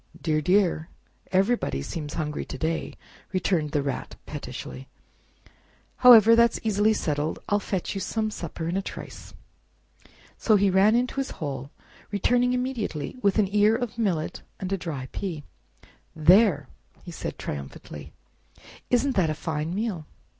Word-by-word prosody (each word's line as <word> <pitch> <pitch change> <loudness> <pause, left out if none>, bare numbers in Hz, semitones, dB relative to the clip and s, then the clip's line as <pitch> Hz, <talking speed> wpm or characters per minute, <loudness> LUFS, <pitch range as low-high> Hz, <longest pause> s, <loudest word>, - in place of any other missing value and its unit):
"Dear, 155 -2 0
dear! 180 -2 +2 0.4
everybody 190 - +1
seems 150 - -5
hungry 150 -2 -3
to - - -7
day!" 160 +3 -2 0.4
returned 180 -5 +1
the 145 -1 0
Rat 140 -2 -4
pettishly; 135 -2 -7 1.1
"however, 230 -3 +8
that's 235 0 +4
easily 215 0 +3
settled—I'll 155 +2 -1
fetch 190 -2 -3
you 195 - -4
Some 215 +3 -1
supper 165 -3 -5
in 170 - -2
a 195 - +1
trice." - - -9 1.0
So 220 - +4
he 200 -1 +3
ran 195 +4 +5
into 250 +2 0
his 270 -1 -1
hole, 140 -3 -5 0.4
returning 245 +5 +2
immediately 250 - -3
with 200 -2 +2
an 200 -2 +1
ear 210 +1 +4
of 235 -1 -4
millet 175 -8 -1 0.2
and 190 0 -3
a - - +3
dry 150 -7 -5
pea. 170 -7 -4 0.7
"There!" 165 - +5 0.4
said - - -5
he, - - -34
triumphantly, 70 -2 -7 0.8
"isn't 255 +2 +2
that 180 -5 +2
a 155 - -1
fine 160 +2 -3
meal?" 200 -7 -3
190 Hz, 140 wpm, -26 LUFS, 155-215 Hz, 1.1 s, however